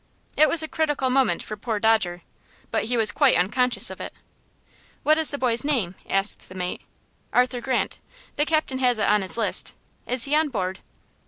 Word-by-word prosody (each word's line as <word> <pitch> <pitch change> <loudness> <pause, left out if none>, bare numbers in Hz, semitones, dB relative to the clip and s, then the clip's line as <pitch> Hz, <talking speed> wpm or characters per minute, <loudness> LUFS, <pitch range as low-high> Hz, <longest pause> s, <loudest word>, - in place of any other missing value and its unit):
It 310 - +5
was 325 -1 +6
a - - -4
critical 295 -5 -1
moment 265 0 +1
for 215 - -6
poor 215 0 -3
Dodger, 205 -6 +1 0.5
but - - 0
he 245 +2 0
was 220 -2 +3
quite 285 -3 +3
unconscious 240 +8 +1
of - - -9
it. - - -6 0.9
"What 310 +1 +3
is 320 - 0
the 285 - -4
boy's 240 -3 +1
name?" 245 -12 0 0.2
asked 195 +1 -1
the 185 - -12
mate. 180 -1 -4 0.5
"Arthur 250 0 +1
Grant. 260 0 -2 0.4
The 295 +1 0
captain 310 -5 0
has 250 -2 +2
it 215 - 0
on 210 0 +3
his 190 +3 -1
list. 225 -3 +2 0.3
Is 250 -1 +1
he 285 - -1
on 310 0 +2
board?" 190 -6 -3
245 Hz, 190 wpm, -24 LUFS, 210-285 Hz, 0.9 s, was